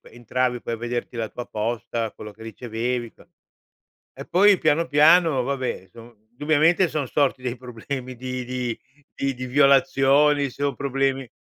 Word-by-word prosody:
entravi 120 +1 -1
poi 115 - -4
a 115 - -4
vederti 120 +1 -4
la 110 -1 -2
tua 120 - -8
posta, 115 +1 -3
quello 105 0 -10
che 110 - -14
ricevevi 120 +1 -3
e - - -18
cos - - -21 0.9
E - - -8
poi 195 +1 +5
piano, 155 +2 +2
piano, 160 -1 +5
vabbè 130 -3 -3
insom 115 +5 -15
indubbiamente 155 +7 +2
son 150 -4 -2
sorti 135 -1 0
dei 125 0 -4
problemi 125 +1 -6
di 125 0 -5
di 125 -2 -3 0.4
di 135 0 -1
di 130 +1 -6
violazioni, 140 +1 +4
se 140 - -12
ho 140 - 0
problemi 135 -1 -1
130 Hz, 165 wpm, -23 LUFS, 120-145 Hz, 0.9 s, poi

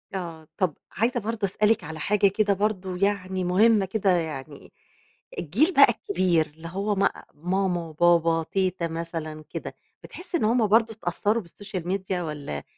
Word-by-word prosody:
آه 165 -4 -6
طب 180 -6 0
عايزة 240 +3 0
برضه 220 -1 -2
أسألِك 210 +3 +2
على 160 +1 -7
حاجة 205 +4 +3
كده 200 +1 +2
برضه 190 -2 -2
يعني 190 -1 0
مُهمة 200 +3 +4
كده 195 +1 0
يعني 155 -5 -2 0.7
الجيل 235 - +2
بقى 275 -5 +7 0.2
كبير 170 -3 +2
اللي 160 +2 -11
هو 200 +4 -2
ما 195 0 +3 0.3
ماما 180 +3 -1
وبابا 165 0 +3
تيتة 185 0 -1
مثلًا 160 -2 -5
كده، - - -6 0.3
بتحسّي 355 -1 -4
إن - - -2
هُم 230 0 +3
برضه 225 +2 +3
اتأثروا 210 +3 -1
بالسوشيال 185 0 -7
ميديا، 190 -1 -2
والّا 145 - -5
185 Hz, 150 wpm, -25 LUFS, 165-210 Hz, 0.7 s, بقى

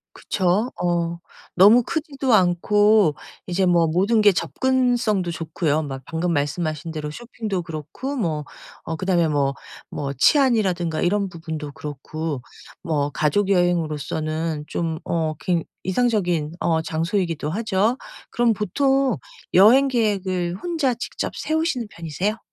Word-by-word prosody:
그쵸. 195 +6 0
어 170 -1 0 0.4
너무 210 +7 +7
크지도 275 -3 -1
않고 205 -1 +4 0.3
이제 185 +1 +1
뭐 170 -2 +4
모든 195 +8 +2
게 210 -1 +6
접근성도 235 - +1
좋고요. 160 -1 -1
막 135 -3 -6
방금 170 +2 -1
말씀하신 155 +1 -2
대로 150 -1 -4
쇼핑도 215 0 -4
그렇고 165 - -6
뭐 160 - -1 0.4
어 160 - -3
그다음에 175 -2 +1
뭐 140 -2 +1 0.4
뭐 140 -1 -3
치안이라든가 185 - +2
이런 200 +2 +1
부분도 160 -3 -6
그렇고 150 0 -5 0.4
뭐 145 -3 -1
가족여행으로서는 160 -3 0
좀 165 -2 -2
어 160 -2 -1
굉 175 -4 0 0.2
이상적인 185 -7 0
어 160 -1 +1
장소이기도 165 -1 -1
하죠. 215 +4 +1 0.3
그럼 240 -1 +2
보통 265 +4 +1 0.4
여행 240 +9 +7
계획을 190 -7 0
혼자 320 -8 0
직접 235 - -5
세우시는 315 -6 -1
편이세요? 175 +7 -3
175 Hz, 280 characters per minute, -22 LUFS, 160-215 Hz, 0.4 s, 너무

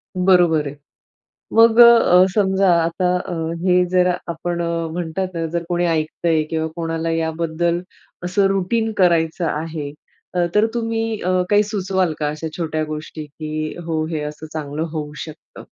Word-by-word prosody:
बरोबर 175 -5 +3
आहे. 140 - -7 0.8
मग 225 +1 +5
अ, 230 -6 +7
समजा 190 -2 +3
आता 170 +2 -1
अ, 180 - -6 0.3
हे 180 -1 +4
जर 180 -1 +4 0.2
आपण 170 +1 -3 0.3
म्हणतात 175 +2 -3
ना 165 -1 -2
जर 170 -1 -1
कोणी 175 0 +1
ऐकतंय 160 0 0
किंवा 160 0 -1
कोणाला 165 -1 -2
याबद्दल 165 +1 -1 0.4
असं 185 +3 +1
रुटीन 195 +4 0
करायचं 170 -2 +2
आहे, 155 -2 -4 0.6
तर 210 +1 +5
तुम्ही 225 -1 -2
अ, 180 - -1 0.2
काही 205 0 +4
सुचवाल 190 -4 -1
का 150 - 0
अशा 155 +2 -5
छोट्या 155 -2 -2
गोष्टी, 155 0 -7
की 155 +1 -5
हो, 160 -1 -1
हे 155 - -2
असं 150 +1 -7
चांगलं 155 0 -4
होऊ 150 -2 -5
शकतं? 155 -2 -13
170 Hz, 145 wpm, -20 LUFS, 155-185 Hz, 0.8 s, अ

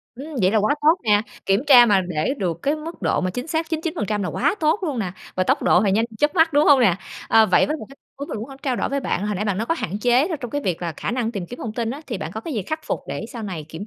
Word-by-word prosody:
Ừm, 270 +4 -8 0.2
vậy 185 - +4
là 220 - +3
quá 215 +8 +2
tốt 315 +3 +5
nè, 210 -1 +4 0.2
kiểm 195 +5 +2
tra 245 -4 +8
mà 200 -3 +4
để 180 - -1
được 170 -3 -2
cái 290 +2 +1
mức 320 +2 -8
độ - - +1
mà 185 - -1
chính 245 - -5
xác 320 0 -2
99% 310 - -2
là 180 - -2
quá 290 +7 +1
tốt 310 +4 +2
luôn 290 -8 -2
nè, 185 -4 -2 0.2
và 185 - +1
tốc - - +1
độ 180 - +4
thì 200 - +2
nhanh 220 +3 +2
chớp 295 +2 +2
mắt, 325 -1 +4
đúng 295 +1 +4
hông 280 -2 +6
nè? 190 -7 +4 0.3
Ờ, 220 -1 +6
vậy 185 - +4
với 305 - -1
một - - -9
cái 275 - -15 0.2
muốn 285 - -6
mình - - -4
muốn 225 +6 -6
h - - -10
trao 260 -4 -1
đổi - - -1
với 280 0 -1
bạn, 205 -6 -2
hồi 210 - -1
nãy 205 +3 -2
bạn 200 -3 0
nói 225 - -2
có 330 - +1
hạn 195 +5 -3
chế 245 +7 +3
trong 245 - -6
cái 290 - -2
việc 180 - -2
là 170 - -2
khả - - -3
năng 240 -2 -1
tìm 185 -4 -4
kiếm 245 - -9
thông 220 - -5
tin 230 -1 -2
á, 275 +4 -6
thì 240 - -4
bạn 160 +3 -5
có 220 - -5
cái 300 +5 -5
gì 215 - -1
khắc 315 - -4
phục - - -2
để - - -4
sau 235 - -6
này 180 -7 -5
kiểm 170 +7 -7
230 Hz, 325 wpm, -22 LUFS, 195-290 Hz, 0.3 s, tra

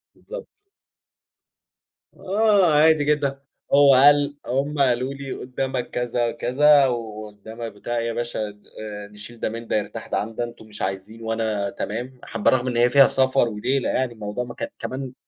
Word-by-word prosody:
بالضبط. - - -9 1.7
آه 200 -4 +3
عادي 155 0 +5
جدًا. 145 -2 0 0.3
هو 140 -1 +7
قال 145 +2 +5
هم 140 +3 -1
قالوا 130 0 +2
لي: 140 -1 -7
"قُدّامك 130 0 -4
كذا، 120 -1 -1
كذا 140 +3 +4
وقُدّامك" 110 -1 -6
"بتاع 120 +4 -5
إيه، 115 - -1
يا 115 - -2
باشا 120 -2 -3
د 105 0 -17 0.2
آآ، 105 -1 -7
نشيل 105 +3 -12
ده - - -1
من 115 +1 -7
ده، - - -1
يرتاح 105 - -5
ده - - -1
عن 110 +2 -4
ده، 120 - -1
أنتم 120 -2 -9
مش 105 -1 -11
عايزين 95 +4 -4
وأنا 110 -3 -1
تمام." 120 +6 -5
حابّة 115 -2 +1
رَغم 130 -1 +1
إن 120 -2 -1
هي 120 +1 +4
فيها 135 +1 +7
سفر 130 -2 +2
وليلة، 125 +5 -1
يعني 130 -2 0
الموضوع 105 +1 -4
ما 120 -1 -8
كان - - -4
كمان 130 0 -5
120 Hz, 175 wpm, -23 LUFS, 110-140 Hz, 1.7 s, هو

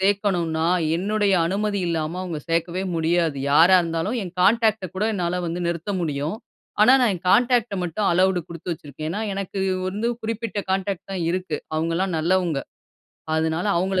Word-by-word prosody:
சேர்க்கணுன்னா 190 -5 +1 0.3
என்னுடைய 205 +2 +1
அனுமதி 200 +3 -1
இல்லாம 165 +1 -2
அவங்க 170 -4 -4
சேர்க்கவே 170 +2 0
முடியாது. 165 -2 +1
யாரா 165 +6 +7
இருந்தாலும் 165 +7 -2
என் 180 - -7
கான்டாக்ட்ட 220 0 +3
கூட 190 +3 -1
என்னால 180 -2 -1
வந்து 170 +2 -3
நிறுத்த 170 +3 -3
முடியும். 155 +3 -2 0.5
ஆனா, 245 - +7
நான் 235 -5 +3
என் 180 - -8
கான்டாக்ட்ட 240 -2 +3
மட்டும் 180 +4 -1
அலவுடு 185 +1 +3
குடுத்து 170 +1 -5
வச்சிருக்கேன். 155 0 -7
ஏனா, 210 - -3
எனக்கு 195 0 -4 0.3
வந்து 210 +5 -2
குறிப்பிட்ட 225 -1 -3
கான்டாக்ட் 195 0 -2
தான் 180 -3 -2
இருக்கு 180 -3 -2 0.2
அவங்கலாம் 165 +3 0
நல்லவங்க. 170 -2 +1 0.8
அதுனால 160 +3 0
அவங்கள 190 +1 0
180 Hz, 150 wpm, -23 LUFS, 165-200 Hz, 0.8 s, யாரா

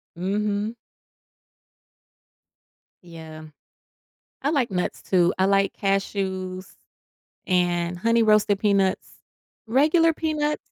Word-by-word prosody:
Mhm. 205 +4 -2 2.3
Yeah. 160 -2 -11 1.0
I 280 - 0
like 275 -8 0
nuts, 180 -1 -3
too. 175 -2 +2
I 190 - +2
like 195 0 +2
cashews 190 -2 -2 0.8
and 175 -1 0
honey 230 +5 +2
roasted 210 -2 +3
peanuts. 200 -2 +1 0.6
Regular 315 +7 +3
peanuts 300 -1 -1
195 Hz, 85 wpm, -24 LUFS, 185-230 Hz, 2.3 s, roasted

